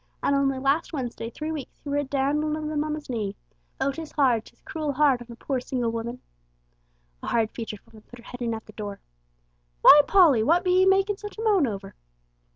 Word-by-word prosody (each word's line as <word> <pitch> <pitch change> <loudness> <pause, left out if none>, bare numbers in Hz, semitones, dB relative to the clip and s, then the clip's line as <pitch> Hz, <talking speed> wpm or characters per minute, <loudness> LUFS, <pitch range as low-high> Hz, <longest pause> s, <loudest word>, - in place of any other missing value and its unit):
An' - - +2
only 275 -1 +1
last 275 +5 0
Wednesday 245 -5 -4
three 305 +6 -5
weeks 300 -4 -7
he - - -11
were 285 0 0
a - - 0
dandlin' 285 +3 0
of 305 -1 -4
'em 300 -1 0
on 305 0 -2
his 305 -1 -9
knee. 215 -6 -3 0.4
Oh, 275 - +1
'tis 320 +2 -8
hard, 250 -7 +2
'tis - - -19
cruel 305 -3 -3
hard 275 -3 +3
on 240 - -10
a - - -9
poor, 265 +2 -2
single 245 -2 -2
woman!" 235 +2 -5 1.0
A - - -7
hard 225 -2 +1
featured 220 -3 -7
woman 220 - -17
put 245 - -12
her 235 - -16
head 245 0 -10
in 230 -1 -1
at 220 - -9
the 215 - -14
door. 205 -2 -6 0.8
"Why, 295 - +10
Polly, 330 - +5
what 335 +10 +3
be 365 - +1
'ee - - +5
makin' 390 +1 +3
such 415 +1 -9
a 445 - -4
moan 400 - +3
over?" 195 -3 -6
275 Hz, 225 wpm, -25 LUFS, 235-305 Hz, 1.0 s, Why